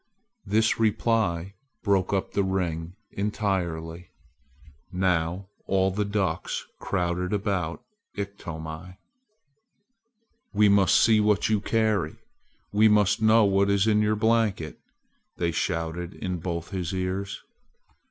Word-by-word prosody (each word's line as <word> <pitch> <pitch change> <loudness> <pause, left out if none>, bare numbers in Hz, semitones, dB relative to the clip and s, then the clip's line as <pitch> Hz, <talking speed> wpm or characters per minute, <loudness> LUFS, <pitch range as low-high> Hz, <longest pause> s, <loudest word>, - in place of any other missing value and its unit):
This 110 +3 +2
reply 105 -5 +1 0.3
broke 100 -3 +2
up 95 -1 -1
the 100 - +1
ring 90 -3 -2 0.2
entirely. 90 -5 -2 0.8
Now 90 0 0 0.2
all 95 0 +2
the 105 +2 -1
ducks 100 -5 -2
crowded 90 0 -1
about 95 -5 -2 0.3
Iktomi. 90 -3 -6 1.6
"We 105 0 +5
must 100 -1 +5
see 110 -1 +5
what 105 -1 +2
you 105 -2 +2
carry! 110 -9 0 0.6
We 105 +2 +5
must 105 -1 +3
know 110 0 +5
what 100 0 +2
is 100 0 +3
in 105 -1 +3
your 105 0 +2
blanket!" 110 -7 0 0.6
they 85 -1 0
shouted 85 +1 -3
in 90 -2 -4
both 85 0 -4
his 95 -1 -3
ears. 95 +2 -3
95 Hz, 115 wpm, -26 LUFS, 85-105 Hz, 1.6 s, We